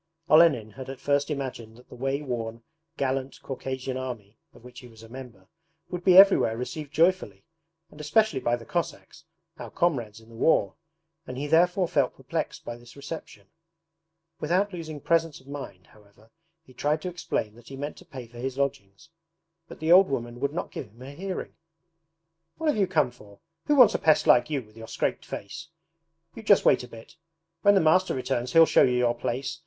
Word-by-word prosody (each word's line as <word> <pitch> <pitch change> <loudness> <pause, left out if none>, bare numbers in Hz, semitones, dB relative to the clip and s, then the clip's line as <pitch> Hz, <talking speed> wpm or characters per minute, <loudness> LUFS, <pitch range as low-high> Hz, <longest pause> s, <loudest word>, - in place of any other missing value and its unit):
Olenin 155 -9 +5
had 130 +4 -9
at 135 -1 -7
first 140 +1 0
imagined 125 -6 -5
that 125 - -18
the - - -14
way 135 +3 -2
worn, 115 -3 -5 0.3
gallant 135 0 -2
Caucasian 130 -1 -5
Army 120 -5 -7 0.2
(of - - -19
which 125 0 -12
he 125 - -13
was 115 -1 -16
a - - -12
member) 115 -6 -11 0.4
would 180 -1 -5
be 185 0 +6
everywhere 190 - +7
received 145 +4 -6
joyfully, 175 +4 +1 0.5
and 150 - -11
especially 155 0 +2
by 120 -1 +1
the 115 -1 -11
Cossacks, 170 -1 -5 0.3
our - - -7
comrades 120 - -1
in 110 0 -19
the 115 - -14
war; 160 +8 +2 0.5
and 130 - -7
he 140 - -3
therefore 175 +4 +3
felt 145 -7 0
perplexed - - -5
by 120 - -5
this 120 -1 -16
reception. 140 -8 -9 0.9
Without 185 +6 0
losing 160 -4 -6
presence 165 +1 0
of 130 - -22
mind 135 -10 -8
however 105 0 -23 0.3
he 130 - -19
tried 150 +5 0
to - - -3
explain 175 -11 -3
that 120 +1 -18
he 135 - -9
meant 145 +2 -5
to - - -13
pay 130 -3 -9
for 120 +1 -14
his 130 +1 -4
lodgings, 135 -2 -4 0.6
but - - -12
the 160 +1 0
old 185 +2 +7
woman 120 -2 -4
would 140 +1 -1
not 170 - -5
give 130 - -6
him 115 +5 -16
a 135 - -9
hearing. 185 +6 -6 1.0
'What 320 -1 0
have 295 - +1
you 195 -2 +2
come 155 -8 +1
for? 105 -5 -17 0.3
Who 295 - +3
wants 250 -6 +7
a - - -1
pest 155 -1 +3
like 120 - +5
you, 140 -4 -2
with 110 0 -22
your 115 0 -10
scraped - - -3
face? 160 +12 -7 0.7
You 225 - -9
just 205 -2 +4
wait 125 - +4
a - - -9
bit; 115 +8 -14 0.4
when 205 0 +5
the 195 - +4
master 185 +4 +3
returns 125 -1 -2
he'll 165 0 +8
show - - +4
you 125 -1 +3
your 120 -1 +2
place. 130 +5 -4
135 Hz, 200 wpm, -26 LUFS, 120-165 Hz, 1.0 s, he'll